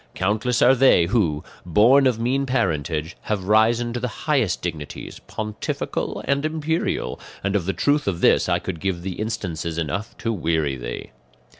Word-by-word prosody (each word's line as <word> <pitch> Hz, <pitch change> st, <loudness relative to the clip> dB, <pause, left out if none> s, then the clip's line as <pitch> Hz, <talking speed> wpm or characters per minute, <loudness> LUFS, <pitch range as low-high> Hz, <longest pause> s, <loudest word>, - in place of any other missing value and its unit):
Countless 110 Hz, +5 st, +1 dB
are 125 Hz, -, +7 dB
they 130 Hz, -9 st, +5 dB
who, 85 Hz, -7 st, +1 dB, 0.2 s
born 120 Hz, -, +5 dB
of 125 Hz, -3 st, +1 dB
mean 135 Hz, +4 st, 0 dB
parentage, 80 Hz, -, -1 dB
have 105 Hz, -3 st, -2 dB
risen 115 Hz, +4 st, +3 dB
to 120 Hz, -, -2 dB
the 125 Hz, -, -1 dB, 0.2 s
highest -, -, +1 dB
dignities, 75 Hz, -2 st, -6 dB
pontifical 105 Hz, -1 st, -3 dB
and 140 Hz, +1 st, +1 dB
imperial, 155 Hz, -, -1 dB, 0.2 s
and 95 Hz, +1 st, 0 dB
of 95 Hz, -4 st, 0 dB
the -, -, +2 dB
truth 145 Hz, -2 st, +1 dB
of 90 Hz, -4 st, 0 dB
this -, -, +4 dB
I 85 Hz, -, +3 dB
could 85 Hz, -1 st, -5 dB
give 90 Hz, -2 st, -2 dB
thee 95 Hz, -, -3 dB
instances 90 Hz, -6 st, -4 dB
enough 85 Hz, +7 st, -3 dB
to 115 Hz, -, -2 dB
weary 80 Hz, -7 st, 0 dB
thee. -, -, -6 dB
105 Hz, 165 wpm, -23 LUFS, 85-120 Hz, 0.2 s, are